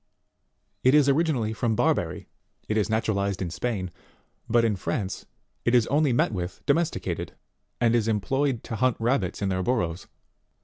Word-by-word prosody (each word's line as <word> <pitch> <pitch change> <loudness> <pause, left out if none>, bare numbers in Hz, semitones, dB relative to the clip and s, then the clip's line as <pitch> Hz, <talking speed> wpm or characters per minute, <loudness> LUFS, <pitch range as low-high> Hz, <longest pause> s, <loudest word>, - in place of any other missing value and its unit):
It 130 +3 +5
is 145 -2 +5
origin 155 +2 +3
ally 110 -3 -1
from 110 0 0
Barbary; - - 0 0.4
it 110 - -1
is 110 0 +1
naturalized 100 -3 0
in 90 -3 -3
Spain, 95 -3 -3 0.6
but 115 0 +4
in 110 -2 +1
France 95 +2 -3 0.4
it 120 - +2
is 120 -3 +5
only 145 0 +3
met 120 - +2
with 90 -3 -4
domesticated, 165 +3 -1 0.5
and 120 -1 +3
is 115 -2 +2
employed 125 +4 0
to 115 - -5
hunt 130 +1 +2
rabbits 115 -5 0
in 100 - +1
their 95 -1 0
burrows. 90 -6 -1
115 Hz, 165 wpm, -26 LUFS, 100-130 Hz, 0.6 s, It